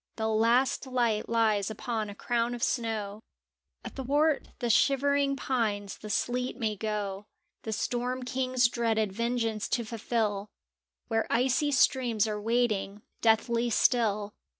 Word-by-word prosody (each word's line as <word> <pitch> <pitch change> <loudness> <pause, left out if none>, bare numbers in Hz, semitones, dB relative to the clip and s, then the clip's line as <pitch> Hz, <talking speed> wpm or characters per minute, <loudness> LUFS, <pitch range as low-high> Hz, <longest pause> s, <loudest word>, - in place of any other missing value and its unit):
The 220 -1 -1
last 235 +5 +2
light 240 -4 0
lies 220 -3 +2
upon 220 0 -3
a 200 - -8
crown 240 +2 -1
of 240 - -5
snow; 220 -4 -2 0.6
Athwart 290 +3 0
the 240 -2 0
shivering 280 +2 +3
pines 215 -7 -2
the 215 - -8
sleet 245 +3 -1
may 220 -4 -1
go 205 -1 -4 0.3
The 220 - -5
Storm 245 +3 -2
King's 255 -1 +1
dreaded 225 -4 0
vengeance 230 -1 -1
to 235 - 0
fulfil 215 -2 -2 0.6
Where 225 -1 0
icy 265 +4 +2
streams 245 -6 +2
are 210 -1 -3
waiting, 215 -3 0 0.2
deathly 230 +1 +2
still. 210 -3 +2
230 Hz, 125 wpm, -29 LUFS, 215-250 Hz, 0.6 s, shivering